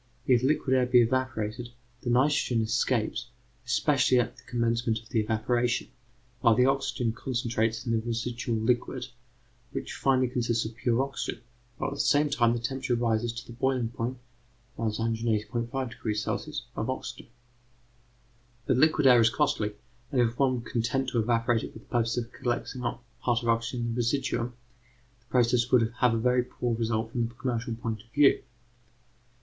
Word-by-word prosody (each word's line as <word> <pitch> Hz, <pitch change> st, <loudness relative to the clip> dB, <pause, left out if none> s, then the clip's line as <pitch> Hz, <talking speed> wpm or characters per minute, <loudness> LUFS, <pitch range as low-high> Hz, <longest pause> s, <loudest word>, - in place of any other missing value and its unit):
if 125 Hz, -3 st, +4 dB
liquid 130 Hz, -1 st, +2 dB
air 125 Hz, -1 st, +3 dB
be 125 Hz, -1 st, +6 dB
evaporated, 120 Hz, -2 st, -2 dB, 0.3 s
the 120 Hz, -, -3 dB
nitrogen 130 Hz, -1 st, +3 dB
escapes, 115 Hz, 0 st, 0 dB, 0.4 s
especially 130 Hz, 0 st, +3 dB
at 120 Hz, -, -1 dB
the -, -, -16 dB
commencement 115 Hz, -1 st, 0 dB
of 110 Hz, 0 st, -19 dB
the 115 Hz, -, +1 dB
evaporation, 120 Hz, +3 st, 0 dB, 0.5 s
while 115 Hz, -2 st, +5 dB
the 125 Hz, +2 st, +4 dB
oxygen 135 Hz, -3 st, 0 dB
concentrates 115 Hz, -2 st, -1 dB
in 115 Hz, -, -1 dB
the 115 Hz, -, +2 dB
residual 120 Hz, 0 st, -2 dB
liquid, 120 Hz, +2 st, 0 dB, 0.7 s
which -, -, -4 dB
finally 130 Hz, -1 st, +2 dB
consists 120 Hz, -2 st, 0 dB
of 110 Hz, 0 st, -6 dB
pure 120 Hz, +1 st, +1 dB
oxygen, 135 Hz, -2 st, -5 dB, 0.3 s
while -, -, -2 dB
at -, -, -3 dB
the 140 Hz, -, -8 dB
same 145 Hz, 0 st, +3 dB
time 120 Hz, -4 st, +3 dB
the -, -, -1 dB
temperature 130 Hz, +1 st, -1 dB
rises 115 Hz, -1 st, +1 dB
to 115 Hz, -1 st, -8 dB
the 120 Hz, -, -10 dB
boiling 125 Hz, -1 st, 0 dB
point 120 Hz, +2 st, -3 dB, 0.3 s
( 120 Hz, -1 st, -25 dB
180.5° 115 Hz, +1 st, -1 dB, 0.3 s
C.) 150 Hz, -1 st, -4 dB
of 110 Hz, -, -2 dB
oxygen. 130 Hz, -, -5 dB, 1.4 s
But 130 Hz, -, +2 dB
liquid 155 Hz, +1 st, +4 dB
air 125 Hz, -3 st, +8 dB
is 115 Hz, -, +5 dB
costly, 125 Hz, -6 st, 0 dB, 0.4 s
and 130 Hz, -, +1 dB
if 120 Hz, 0 st, +1 dB
one 130 Hz, -3 st, +2 dB
were -, -, -11 dB
content 130 Hz, +3 st, 0 dB
to 120 Hz, -, 0 dB
evaporate 115 Hz, 0 st, +2 dB
it -, -, -7 dB
for -, -, -10 dB
the 110 Hz, -, -15 dB
purpose 115 Hz, -2 st, 0 dB
of 120 Hz, -1 st, -3 dB
collecting 125 Hz, +1 st, -3 dB
a 120 Hz, -1 st, -2 dB, 0.2 s
part 120 Hz, -2 st, +1 dB
of -, -, -7 dB
the 115 Hz, -, +4 dB
oxygen 115 Hz, +2 st, -1 dB
in 115 Hz, 0 st, -1 dB
the -, -, -5 dB
residuum, 120 Hz, -1 st, 0 dB, 0.7 s
the 120 Hz, -, -34 dB
process 120 Hz, -1 st, +2 dB
would 115 Hz, -3 st, +4 dB
have 125 Hz, -2 st, +4 dB
a -, -, +1 dB
very 125 Hz, +2 st, +3 dB
poor 120 Hz, -1 st, -2 dB
result 110 Hz, 0 st, -1 dB
from 120 Hz, -1 st, 0 dB
the 120 Hz, -, -14 dB
commercial 120 Hz, -2 st, -2 dB
point 110 Hz, -2 st, -4 dB
of 110 Hz, -, -23 dB
view. 145 Hz, +3 st, +4 dB
120 Hz, 175 wpm, -28 LUFS, 115-125 Hz, 1.4 s, air